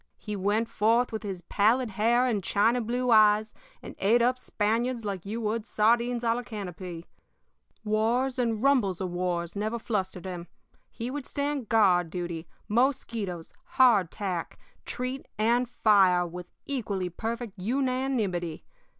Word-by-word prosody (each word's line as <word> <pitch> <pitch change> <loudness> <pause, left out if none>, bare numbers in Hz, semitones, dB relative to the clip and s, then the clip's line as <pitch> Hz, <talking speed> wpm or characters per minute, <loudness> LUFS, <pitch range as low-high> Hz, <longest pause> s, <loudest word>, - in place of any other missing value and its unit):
He 210 -2 -5
went 205 +4 0
forth 230 +3 +2
with 220 - -4
his 190 -5 -6
pallid 225 +6 +2
hair 230 +5 +2
and 215 -6 0
china 225 +7 +2
blue 245 +2 -1
eyes 215 0 +5 0.3
and - - -9
ate 220 +5 +4
up 250 +1 +2
Spaniards 230 +2 -1
like 195 -2 -4
you 220 +3 -3
would 220 +1 -1
sardines 235 +2 +1
à 230 -1 +3
la 240 - -2
canopy. 185 -7 -7 0.8
Wars 235 +5 +1
and 230 -2 0
rumbles 240 -10 +3
of 185 -2 -3
wars 175 -1 -2
never 215 +3 -2
flustered 190 -5 -3
him. 175 -2 -6 0.4
He 235 +2 -5
would 285 -1 -5
stand 285 -4 -3
guard 185 -6 +4
duty, 170 -1 -5 0.2
mosquitoes, 220 - -1 0.2
hardtack, 195 -7 +2 0.3
treat, 255 +2 -4
and 235 +3 +2
fire 190 -6 +4
with 175 +1 -8 0.2
equally 205 -9 -2
perfect 225 +2 -5
unanimity. 235 - -1
215 Hz, 140 wpm, -28 LUFS, 190-240 Hz, 0.8 s, eyes